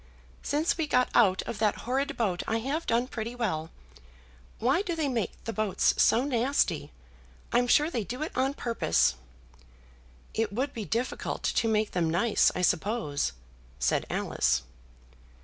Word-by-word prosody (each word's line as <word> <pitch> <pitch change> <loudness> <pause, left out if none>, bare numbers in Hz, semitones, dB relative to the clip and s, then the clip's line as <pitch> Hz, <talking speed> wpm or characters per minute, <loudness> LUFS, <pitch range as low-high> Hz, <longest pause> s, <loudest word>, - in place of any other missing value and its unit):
"Since 305 +4 0
we 315 - 0
got 250 -3 +2
out 190 -5 +4
of 220 - -6
that 215 -2 +1
horrid 265 +3 -1
boat 195 -7 0
I 225 - +1
have 275 +8 -3
done 235 +2 +2
pretty 235 -1 -5
well. 165 -10 -2 0.9
Why 265 - +2
do 355 -4 -3
they 315 -3 0
make 230 -8 -3
the 225 - -4
boats 215 -3 +2
so 235 - +4
nasty? 270 0 0 0.6
I'm 245 +1 +3
sure 300 +6 +4
they 235 -7 -1
do 250 +8 -4
it 315 - -4
on 265 +2 +1
purpose." 230 - +1 1.2
"It 220 -2 0
would 260 +7 -2
be 220 -3 -5
difficult 235 +5 -2
to 230 - +1
make 215 -1 +1
them 170 -3 0
nice, 200 +7 +3
I 180 - -1
suppose?" 175 - 0 0.4
said - - 0
Alice. - - 0
235 Hz, 155 wpm, -28 LUFS, 205-265 Hz, 1.2 s, out